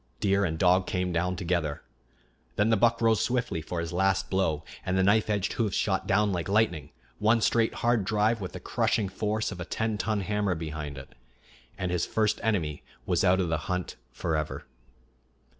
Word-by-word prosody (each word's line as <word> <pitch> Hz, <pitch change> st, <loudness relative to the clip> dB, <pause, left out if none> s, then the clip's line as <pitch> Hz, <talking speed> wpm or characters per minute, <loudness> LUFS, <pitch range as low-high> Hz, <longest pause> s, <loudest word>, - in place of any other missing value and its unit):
Deer 100 Hz, 0 st, +2 dB
and 80 Hz, -4 st, -1 dB
dog 90 Hz, +1 st, +3 dB
came 90 Hz, -1 st, -1 dB
down 90 Hz, +2 st, 0 dB
together. 85 Hz, -4 st, -2 dB, 0.7 s
Then 105 Hz, +2 st, +2 dB
the -, -, +5 dB
buck 115 Hz, +2 st, +2 dB
rose 115 Hz, -1 st, +4 dB
swiftly 120 Hz, -9 st, -1 dB
for 85 Hz, +2 st, -4 dB
his 85 Hz, 0 st, -4 dB
last 95 Hz, +1 st, +1 dB
blow, 80 Hz, -6 st, 0 dB, 0.2 s
and 95 Hz, 0 st, -1 dB
the 95 Hz, -, +3 dB
knife 105 Hz, +3 st, +3 dB
edged 100 Hz, -2 st, 0 dB
hoofs 110 Hz, -5 st, 0 dB
shot 95 Hz, -2 st, 0 dB
down 105 Hz, +1 st, +3 dB
like 90 Hz, -1 st, -2 dB
lightning; 95 Hz, -9 st, +1 dB, 0.3 s
one 110 Hz, +2 st, +4 dB
straight, 115 Hz, 0 st, +2 dB
hard 120 Hz, -3 st, +3 dB
drive 105 Hz, +3 st, +1 dB
with 90 Hz, -2 st, -5 dB
the -, -, -6 dB
crushing 100 Hz, -3 st, 0 dB
force 105 Hz, +3 st, -2 dB
of 90 Hz, -, -7 dB
a -, -, -3 dB
ten 110 Hz, +2 st, -2 dB
ton 110 Hz, -2 st, 0 dB
hammer 100 Hz, -1 st, 0 dB
behind 75 Hz, -3 st, -5 dB
it 65 Hz, 0 st, -11 dB, 0.6 s
and 90 Hz, -2 st, -2 dB
his 90 Hz, -1 st, 0 dB
first 110 Hz, -2 st, +1 dB
enemy 90 Hz, -9 st, -1 dB, 0.2 s
was 90 Hz, -1 st, +1 dB
out 95 Hz, 0 st, +4 dB
of 90 Hz, -3 st, 0 dB
the 80 Hz, -, +1 dB
hunt 90 Hz, -1 st, -2 dB, 0.2 s
forever. 80 Hz, +3 st, -3 dB
95 Hz, 190 wpm, -28 LUFS, 85-105 Hz, 0.7 s, the